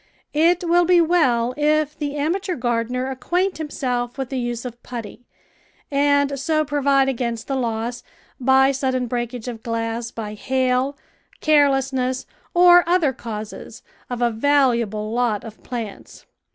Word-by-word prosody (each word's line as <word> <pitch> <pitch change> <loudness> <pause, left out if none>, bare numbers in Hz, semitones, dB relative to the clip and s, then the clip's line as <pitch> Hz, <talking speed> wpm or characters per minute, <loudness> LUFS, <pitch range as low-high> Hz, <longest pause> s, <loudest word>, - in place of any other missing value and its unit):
It 335 +4 +3
will 350 +1 +4
be 355 0 +5
well 260 -9 +2
if 300 0 +1
the 290 -1 -4
amateur 355 +6 -1
gardener 245 +1 -1
acquaint 355 +9 -1
himself 250 -5 -3
with 265 -2 -3
the 265 - -1
use 240 0 -3
of 240 -1 -7
putty, 240 0 -8 0.6
and 285 0 +2
so 310 +2 +1
pro 290 0 -2
vide 275 -1 +3
against 235 -3 -2
the 275 - -1
loss, 235 -1 -2 0.4
by 265 +1 +4
sudden 260 -2 -1
breakage 240 0 -4
of 230 -2 -6
glass 230 0 -3
by 215 -2 -6
hail, 260 +4 0 0.4
carelessness, 270 -4 +2 0.3
or 350 0 +7
other 340 -6 +3
causes, 220 -1 -8 0.3
of 245 -1 -2
a 240 - +2
valuable 235 -4 +1
lot 235 -3 0
of 220 -2 -11
plants. 230 -5 -7
260 Hz, 140 wpm, -22 LUFS, 235-290 Hz, 0.6 s, or